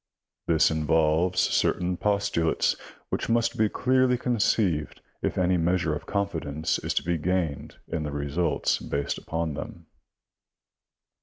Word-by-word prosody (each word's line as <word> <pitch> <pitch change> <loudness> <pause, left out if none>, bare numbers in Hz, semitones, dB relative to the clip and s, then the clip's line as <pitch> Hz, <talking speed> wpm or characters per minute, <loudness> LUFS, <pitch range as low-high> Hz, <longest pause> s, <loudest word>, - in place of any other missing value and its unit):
This 80 -2 +4
involves 80 +3 +2
certain 90 0 +1
postulates 100 -4 +1 0.3
which - - -2
must 115 0 +2
be 110 -1 +2
clearly 130 +1 +2
conceived 105 - 0 0.2
if - - -2
any 90 0 +2
measure 85 -1 +1
of 75 - -6
confidence 80 -6 -1
is - - -3
to - - +1
be 85 -1 -1
gained 85 -3 -1
in 80 - -3
the 75 -1 -3
results 75 +4 0
based 70 0 -3
upon 80 -1 -3
them. - - -8
85 Hz, 130 wpm, -26 LUFS, 80-100 Hz, 0.3 s, This